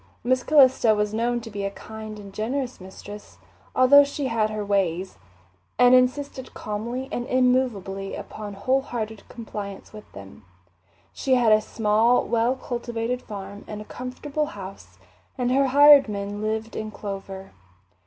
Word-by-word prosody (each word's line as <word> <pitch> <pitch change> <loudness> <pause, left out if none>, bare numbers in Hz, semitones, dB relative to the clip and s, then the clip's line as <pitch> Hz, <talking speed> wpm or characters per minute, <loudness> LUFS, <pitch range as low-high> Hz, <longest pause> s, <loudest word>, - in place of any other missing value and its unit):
Miss 255 +1 +2
Calista 260 -7 +5
was 210 0 -1
known 240 +2 0
to 225 -1 -10
be 200 -1 -4
a 195 - -1
kind 215 +1 -9
and 200 -1 -11
generous 250 +2 -3
mistress, 205 +2 -11 0.4
although 285 +3 +7
she 280 0 -4
had 220 -2 +1
her 215 -1 -4
"ways," 190 -2 -1 0.6
and 245 +2 +6
insisted 255 +1 +1
calmly 235 +5 -4
and 245 +1 -3
immovably 250 -7 0
upon 205 -2 -8
wholehearted 225 -2 -2
compliance 210 -4 -8
with 210 0 -12
them. 100 +1 -12 0.7
She 265 -1 +1
had 240 -3 +3
a 215 0 +5
small, 220 +3 +2
well 235 +2 +1
cultivated 240 -1 -4
farm 200 -1 -8
and 210 - -6
a 210 - -8
comfortable 280 +6 -4
house, 185 - -10 0.4
and 250 -1 0
her 270 +1 +3
hired 285 -1 +7
men 205 0 -4
lived 220 +1 -3
in 215 0 -4
clover. 195 -2 -7
220 Hz, 145 wpm, -24 LUFS, 205-255 Hz, 0.7 s, although